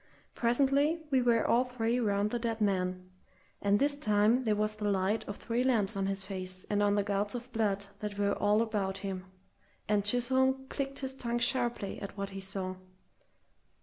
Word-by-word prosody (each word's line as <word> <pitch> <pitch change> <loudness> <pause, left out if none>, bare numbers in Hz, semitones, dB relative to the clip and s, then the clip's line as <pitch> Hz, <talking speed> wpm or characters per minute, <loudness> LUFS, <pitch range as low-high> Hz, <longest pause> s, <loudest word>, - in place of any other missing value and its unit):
Presently 280 +6 +2
we 260 -1 +4
were 235 -1 +3
all 240 +2 +4
three 245 -1 -1
round 205 -2 +1
the 240 - -1
dead 230 -1 -2
man, 185 -3 -1 0.5
and 200 0 +3
this 285 +4 +1
time 220 -1 +2
there 215 -1 +2
was 215 +1 -1
the 210 -1 -1
light 195 +2 +1
of 205 - -5
three 240 +2 -1
lamps 220 -6 +2
on 195 0 0
his 195 0 -1
face 185 -1 -3
and 205 0 +2
on 205 0 +3
the 205 - +2
gouts 205 +2 -1
of 245 +1 -6
blood 205 -3 0
that 210 -1 -5
were 200 0 +2
all 210 +2 +2
about 200 -4 -2
him, 190 -1 -4 0.6
and 205 -1 +2
Chisholm 260 +4 +2
clicked 275 -1 -3
his 265 -1 -1
tongue 240 -2 -2
sharply 240 -4 0
at 200 0 -7
what 200 0 -4
he 195 - -6
saw. 190 -1 -2
210 Hz, 185 wpm, -31 LUFS, 200-245 Hz, 0.6 s, we